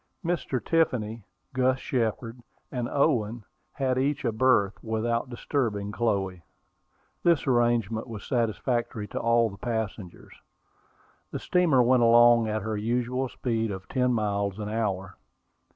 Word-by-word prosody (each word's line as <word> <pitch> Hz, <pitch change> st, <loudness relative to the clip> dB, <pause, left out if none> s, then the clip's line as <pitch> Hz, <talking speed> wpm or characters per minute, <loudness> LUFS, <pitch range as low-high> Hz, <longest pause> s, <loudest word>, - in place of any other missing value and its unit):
Mr. 165 Hz, -6 st, -1 dB
Tiffany, 120 Hz, -9 st, 0 dB, 0.3 s
Gus 130 Hz, 0 st, +2 dB
Shepard, 115 Hz, -1 st, -2 dB, 0.3 s
and 120 Hz, -2 st, -3 dB
Owen 120 Hz, -6 st, +1 dB, 0.3 s
had 130 Hz, -2 st, 0 dB
each 140 Hz, +1 st, 0 dB
a 115 Hz, -, +2 dB
berth, 110 Hz, -4 st, +2 dB
without 115 Hz, +2 st, -1 dB
disturbing 115 Hz, -5 st, -2 dB
Chloe. 100 Hz, -5 st, -1 dB, 0.8 s
This 170 Hz, -4 st, +3 dB
arrangement 120 Hz, -3 st, +1 dB
was 110 Hz, -4 st, -7 dB
satisfactory 120 Hz, -2 st, -1 dB
to -, -, -4 dB
all 115 Hz, -1 st, +2 dB
the 100 Hz, -, -11 dB
passengers. 110 Hz, -5 st, -5 dB, 1.0 s
The -, -, -4 dB
steamer 160 Hz, -8 st, +3 dB
went 125 Hz, +1 st, +4 dB
along 120 Hz, 0 st, +6 dB
at 110 Hz, -1 st, -2 dB
her 110 Hz, 0 st, -2 dB
usual 125 Hz, +4 st, -1 dB
speed 115 Hz, -3 st, -2 dB
of 95 Hz, -2 st, -6 dB
ten 125 Hz, -1 st, +1 dB
miles 100 Hz, -3 st, -1 dB
an 105 Hz, -1 st, -4 dB
hour. 100 Hz, -4 st, -2 dB
115 Hz, 130 wpm, -27 LUFS, 105-125 Hz, 1.0 s, along